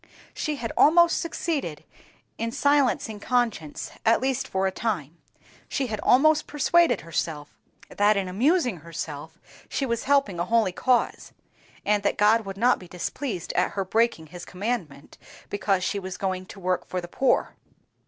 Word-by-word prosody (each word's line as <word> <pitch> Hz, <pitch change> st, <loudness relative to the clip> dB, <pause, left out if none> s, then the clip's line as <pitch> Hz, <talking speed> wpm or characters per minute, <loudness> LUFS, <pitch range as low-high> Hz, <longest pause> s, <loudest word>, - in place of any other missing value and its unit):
She 305 Hz, -, -2 dB
had 230 Hz, -5 st, -4 dB
almost 340 Hz, +2 st, +5 dB
succeeded 310 Hz, -, -3 dB, 0.6 s
in 230 Hz, 0 st, -2 dB
silencing 265 Hz, -6 st, +1 dB
conscience, 225 Hz, -, -1 dB
at 225 Hz, 0 st, +4 dB
least 265 Hz, 0 st, -1 dB
for 190 Hz, 0 st, -1 dB
a 190 Hz, -, +1 dB
time; 175 Hz, -7 st, -3 dB, 0.5 s
she 275 Hz, -, -1 dB
had 215 Hz, -4 st, -4 dB
almost 305 Hz, +4 st, +4 dB
persuaded 295 Hz, -, +3 dB
herself 155 Hz, -2 st, -4 dB, 0.3 s
that 205 Hz, +1 st, +2 dB
in 195 Hz, -1 st, -1 dB
amusing 245 Hz, -, +1 dB
herself 160 Hz, 0 st, -7 dB, 0.3 s
she 275 Hz, -, -1 dB
was 235 Hz, -3 st, -2 dB
helping 275 Hz, -11 st, +2 dB
a 175 Hz, -, 0 dB
holy 225 Hz, -2 st, +2 dB
cause; 250 Hz, +6 st, 0 dB, 0.5 s
and 210 Hz, 0 st, +2 dB
that 200 Hz, -, 0 dB
God 215 Hz, +1 st, +3 dB
would 195 Hz, 0 st, -6 dB
not 245 Hz, +4 st, +3 dB
be 180 Hz, -, -12 dB
displeased 180 Hz, -, -4 dB
at -, -, +1 dB
her 195 Hz, -1 st, -2 dB
breaking 225 Hz, -4 st, +1 dB
His 175 Hz, -1 st, -8 dB
commandment, 180 Hz, -, -5 dB, 0.3 s
because 195 Hz, -2 st, 0 dB
she 200 Hz, -, -1 dB
was 185 Hz, -1 st, -6 dB
going 185 Hz, -1 st, -3 dB
to 200 Hz, -, -11 dB
work 180 Hz, -1 st, -1 dB
for 185 Hz, -, -3 dB
the 175 Hz, -, -7 dB
poor. 260 Hz, +9 st, +1 dB
210 Hz, 160 wpm, -25 LUFS, 180-255 Hz, 0.6 s, almost